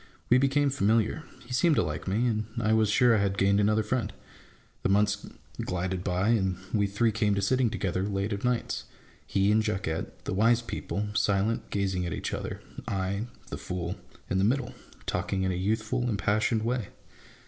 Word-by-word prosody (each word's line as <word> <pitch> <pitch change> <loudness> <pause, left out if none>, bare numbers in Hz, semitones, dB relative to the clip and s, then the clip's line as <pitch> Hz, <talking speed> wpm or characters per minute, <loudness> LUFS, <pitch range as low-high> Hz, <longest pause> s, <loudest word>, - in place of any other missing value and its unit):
We 125 - +7
became 140 +1 +2
familiar: 115 +3 +1 0.2
he 125 - -7
seemed 160 +4 +4
to - - +3
like 75 +3 -4
me, 105 +6 +1
and 110 -3 0
I 110 -1 +2
was 110 -2 +3
sure 120 +2 +5
I - - +3
had 100 -1 0
gained 100 +1 +3
another 105 +1 +3
friend. 110 -1 -1 0.7
The - - 0
months 100 +1 +2 0.4
glided 90 0 -2
by, 95 +3 +1
and 95 -6 +2 0.2
we 100 -2 +3
three 110 +3 +1
came 105 -1 +1
to 100 - 0
sitting 125 +3 +3
together 95 -4 -1
late 100 +1 -1
of 100 - -4
nights: 125 -1 -1 0.4
he 100 +1 +2
and 110 +1 +4
Jacquette, 95 -6 -3
the - - -2
wise 115 +4 +3
people, 105 -2 -3
silent, 105 +1 +1
gazing 95 -3 -1
at 85 - -3
each - - -3
other; - - -4 0.3
I, 100 +3 -1 0.2
the - - -4
fool, 90 0 -3 0.3
in 95 - 0
the - - +2
middle, 130 +6 +1 0.3
talking 95 +2 -1
in 95 - +1
a - - -1
youthful, 110 +6 0
impassioned 110 +1 +1
way. 120 -3 -1
105 Hz, 185 wpm, -28 LUFS, 95-115 Hz, 0.7 s, We